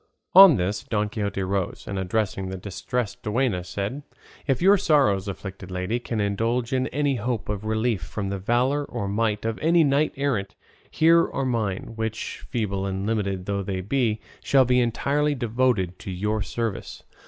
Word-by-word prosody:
On 190 -4 +10
this 100 +1 -1
Don 105 -1 -1
Quixote 100 -2 -2
rose, 95 -1 -2
and 100 - -3
addressing 95 0 -1
the 95 - -5
Distressed 105 +4 -4
Duenna, 105 -4 0
said, 100 +9 -4 0.5
"If 135 -3 +2
your 195 +3 +6
sorrows, 135 - +2
afflicted 95 -1 -7
lady, 90 +6 -2
can 115 -2 -4
indulge 115 +5 0
in 130 0 +1
any 140 -1 0
hope 115 -1 -3
of 105 0 -3
relief 110 -2 0
from 100 +4 -4
the 100 0 -3
valour 125 +8 +1
or 120 -7 -4
might 105 +1 0
of 115 -1 -2
any 165 +1 +4
knight 145 +1 +2
errant, 125 -9 -1 0.3
here 165 +1 +4
are 135 - -2
mine, 110 -5 -2
which, 110 0 -4
feeble 100 -5 -2
and 95 0 -3
limited 100 -4 -1
though 100 0 -1
they 95 -1 -3
be, 110 +1 0 0.2
shall 135 -2 +4
be 125 +1 +3
entirely 145 +5 +1
devoted 115 -7 0
to - - -8
your 105 +4 -1
service. 115 -1 -4
110 Hz, 170 wpm, -25 LUFS, 100-130 Hz, 0.5 s, On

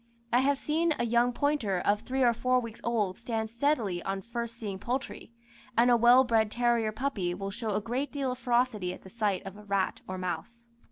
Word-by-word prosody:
I 245 - +6
have 280 +2 +2
seen 320 +3 +1
a 240 - 0
young 235 +1 +3
pointer 245 -8 0
of 205 +3 +2
three 265 0 -1
or 240 -1 +5
four 255 +2 +2
weeks 230 -2 -8
old 210 -6 0
stand 225 -2 -3
steadily 235 -8 0
on 195 +1 -3
first 235 0 -4
seeing 200 -5 -5
poultry, 250 +2 -4 0.5
and 240 +1 +5
a - - +7
well 240 +2 +7
bred 225 -4 +2
terrier 235 -1 +1
puppy 215 -7 -2
will 195 +1 -4
show 215 -1 -3
a 210 - 0
great 245 +6 -2
deal 275 -3 -1
of 250 - -6
ferocity 240 -7 +1
at - - -17
the 190 - -11
sight 210 -5 -1
of 195 +1 -8
a 210 - -12
rat 200 -2 -1
or 185 - -4
mouse. 185 +7 -5
235 Hz, 215 wpm, -29 LUFS, 205-250 Hz, 0.5 s, a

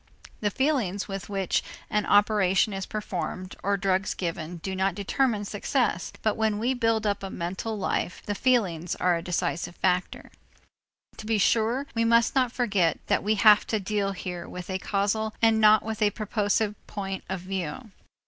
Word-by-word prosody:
The 210 - +1
feelings 230 -6 0
with 195 -1 -6
which 195 -3 0 0.2
an 210 -1 0
operation 205 -1 +3
is 195 -1 -4
performed 185 -3 -4
or 200 +1 +1
drugs 190 0 0
given 170 -1 -4
do 190 +3 -5
not 190 -1 0
determine 210 +1 0
success, 205 - -1
but 215 - +2
when 220 -1 +1
we 240 +5 +1
build 225 -3 +1
up 200 -1 0
a 195 - -5
mental 190 +6 -4
life, 185 -2 -2
the 205 - -1
feelings 195 -9 +1
are 180 -1 +2
a 170 - -2
decisive 175 0 -2
factor. 180 -1 -1 0.9
To 215 - -8
be 225 -1 +2
sure, 230 +6 +2
we 230 - +1
must 230 0 +4
not 255 -3 +2
forget 200 - +1
that - - +1
we 215 +2 +1
have 210 0 +6
to 220 - 0
deal 200 0 -1
here 180 -2 -6
with 180 +1 -7
a 190 - -1
causal 210 +3 -1
and 225 -1 +4
not 215 0 +6
with 220 0 -5
a 210 - +5
purposive 210 0 0
point 195 -2 -5
of 190 -1 -3
view. 190 +3 -5
205 Hz, 175 wpm, -26 LUFS, 185-220 Hz, 0.9 s, have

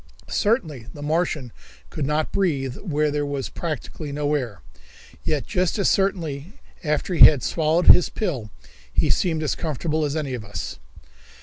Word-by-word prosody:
Certainly 165 - 0
the 145 - -8
Martian 155 -5 -1 0.4
could 135 - -2
not 150 +1 0
breathe 140 -9 0
where 150 -5 0
there 145 0 0
was 140 -2 -3
practically 155 -2 -5
no 145 +1 -1
air, 120 - -3 0.6
yet 150 -3 -1
just 180 -1 0
as 200 - +3
certainly 175 -4 -1 0.3
after 150 +3 -1
he 165 - +10
had 145 -5 +1
swallowed 160 +2 +1
his 180 - +7
pill 140 - -3 0.4
he - - +2
seemed 160 - +1
as 150 - 0
comfortable 155 0 -2
as 145 0 -1
any 145 -4 -2
of 120 -3 -4
us. 100 -4 -6
150 Hz, 160 wpm, -23 LUFS, 140-170 Hz, 0.6 s, he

